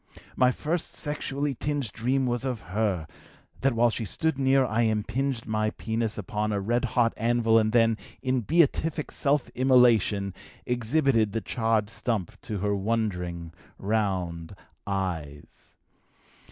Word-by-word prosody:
My 125 Hz, -, +4 dB
first 160 Hz, +6 st, -3 dB
sexually 145 Hz, -1 st, -2 dB
tinged 140 Hz, -3 st, -2 dB
dream 130 Hz, +5 st, 0 dB
was 120 Hz, 0 st, -1 dB
of 125 Hz, -4 st, -3 dB
her 100 Hz, -6 st, 0 dB, 0.5 s
that 135 Hz, -1 st, +2 dB
while 120 Hz, +1 st, +3 dB
she 115 Hz, -, -3 dB
stood 145 Hz, +7 st, -1 dB
near 135 Hz, 0 st, +4 dB
I 115 Hz, 0 st, 0 dB
impinged 115 Hz, +3 st, -1 dB
my 110 Hz, -1 st, 0 dB
penis 110 Hz, 0 st, -3 dB
upon 105 Hz, -2 st, -2 dB
a 100 Hz, -, 0 dB
red 120 Hz, +6 st, 0 dB
hot 115 Hz, -1 st, +4 dB
anvil 115 Hz, 0 st, +3 dB
and 110 Hz, 0 st, +1 dB
then, 115 Hz, -2 st, +3 dB, 0.2 s
in 130 Hz, -1 st, 0 dB
beatific 155 Hz, -, +1 dB
self 145 Hz, -2 st, +1 dB
immolation, 120 Hz, -6 st, +3 dB, 0.3 s
exhibited 120 Hz, -2 st, +1 dB
the 115 Hz, -, -1 dB
charred 110 Hz, -2 st, 0 dB
stump 110 Hz, -7 st, -3 dB
to 110 Hz, -4 st, -4 dB
her 100 Hz, 0 st, +1 dB
wondering, 90 Hz, -6 st, -2 dB, 0.2 s
round 95 Hz, -5 st, -2 dB, 0.3 s
eyes. 85 Hz, -7 st, -5 dB
115 Hz, 135 wpm, -27 LUFS, 105-130 Hz, 0.5 s, My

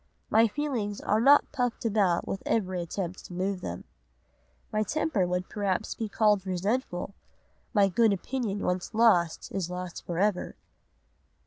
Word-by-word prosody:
My 225 Hz, +1 st, +6 dB
feelings 225 Hz, -5 st, -2 dB
are 215 Hz, +1 st, +1 dB
not 280 Hz, +4 st, +6 dB
puffed 245 Hz, -4 st, -2 dB
about 200 Hz, -6 st, +2 dB
with 195 Hz, -, -3 dB
every 185 Hz, -5 st, 0 dB
attempt 175 Hz, +1 st, -5 dB
to -, -, -10 dB
move 185 Hz, +1 st, -2 dB
them. 90 Hz, -, -5 dB, 0.9 s
My 215 Hz, -, +2 dB
temper 235 Hz, -, 0 dB
would 180 Hz, +1 st, -2 dB
perhaps 200 Hz, -3 st, -1 dB
be 220 Hz, -2 st, -4 dB
called 210 Hz, -2 st, +3 dB
resentful. 190 Hz, +1 st, -2 dB, 0.6 s
My 205 Hz, -4 st, +4 dB
good 220 Hz, +3 st, +3 dB
opinion 205 Hz, +1 st, -2 dB
once 180 Hz, +4 st, -2 dB
lost 195 Hz, -8 st, +3 dB
is 185 Hz, -3 st, -2 dB
lost 180 Hz, -1 st, -6 dB
for 170 Hz, -, -4 dB
ever. 200 Hz, 0 st, 0 dB
200 Hz, 145 wpm, -28 LUFS, 180-225 Hz, 0.9 s, My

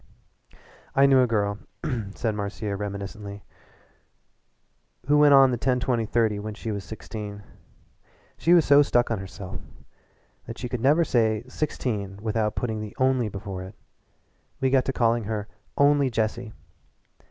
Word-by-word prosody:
"I 135 Hz, -, +6 dB
knew 135 Hz, -1 st, +6 dB
a 125 Hz, -, +3 dB
girl," 105 Hz, -2 st, 0 dB, 0.6 s
said 115 Hz, -2 st, -1 dB
Marcia 105 Hz, 0 st, -4 dB
reminiscently, 100 Hz, 0 st, -6 dB, 1.6 s
"who 150 Hz, +2 st, +4 dB
went 145 Hz, -1 st, +7 dB
on 135 Hz, -1 st, +7 dB
the 120 Hz, -, -2 dB
ten 125 Hz, 0 st, +1 dB
twenty 120 Hz, -3 st, 0 dB
thirty 110 Hz, -2 st, +1 dB
when 105 Hz, 0 st, -6 dB
she 110 Hz, +1 st, -5 dB
was 100 Hz, -2 st, -4 dB
sixteen. 105 Hz, -1 st, -8 dB, 0.9 s
She 170 Hz, +2 st, +4 dB
was 170 Hz, -, +5 dB
so 140 Hz, +1 st, +7 dB
stuck 120 Hz, -4 st, +2 dB
on 110 Hz, -, 0 dB
herself 95 Hz, 0 st, -8 dB, 0.9 s
that 115 Hz, +1 st, -7 dB
she 125 Hz, -, -4 dB
could 125 Hz, -2 st, -3 dB
never 150 Hz, +6 st, +4 dB
say 110 Hz, -6 st, +1 dB
'sixteen' 110 Hz, -8 st, -3 dB
without 110 Hz, 0 st, -1 dB
putting 110 Hz, -3 st, -2 dB
the 105 Hz, -1 st, -8 dB
'only' 130 Hz, -3 st, +2 dB
before 100 Hz, -1 st, -6 dB
it. 95 Hz, +3 st, -9 dB, 0.8 s
We 130 Hz, -1 st, +1 dB
got 135 Hz, -1 st, +3 dB
to -, -, 0 dB
calling 115 Hz, -3 st, +1 dB
her 105 Hz, -1 st, -3 dB, 0.3 s
'Only 140 Hz, -1 st, +4 dB
Jessie.' 110 Hz, 0 st, -2 dB
115 Hz, 150 wpm, -25 LUFS, 105-130 Hz, 1.6 s, went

